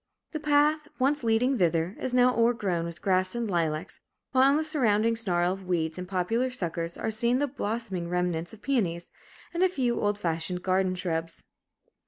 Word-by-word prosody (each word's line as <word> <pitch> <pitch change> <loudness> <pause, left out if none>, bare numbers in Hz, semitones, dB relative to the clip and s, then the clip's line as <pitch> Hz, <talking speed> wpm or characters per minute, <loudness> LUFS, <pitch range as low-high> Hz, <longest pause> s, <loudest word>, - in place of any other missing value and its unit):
The 310 - -3
path, 300 0 +2
once 275 +1 +1
leading 235 +3 +2
thither, 170 +2 +1
is 260 - -2
now 250 0 +4
o'ergrown 210 -8 +1
with 170 0 -8
grass 185 +1 +2
and 235 -1 -1
lilacs, 165 -2 -2 0.3
while 265 +1 +5
in 280 - +3
the 315 - 0
surrounding 230 -8 +2
snarl 180 -5 +1
of 190 -1 -10
weeds 160 -2 -1
and 180 - -6
poplar 200 +7 0
suckers 170 -8 -4
are 220 - -2
seen 235 +3 +1
the 290 +2 +1
blossoming 220 -8 -4
remnants 175 -1 -1
of 220 - -14
peonies, 185 -11 -1 0.4
and 345 - -1
a 375 - +5
few 250 -8 -1
old 205 0 +1
fashioned 180 -1 -2
garden 185 0 +1
shrubs. 165 -2 -3
205 Hz, 180 wpm, -27 LUFS, 175-250 Hz, 0.4 s, while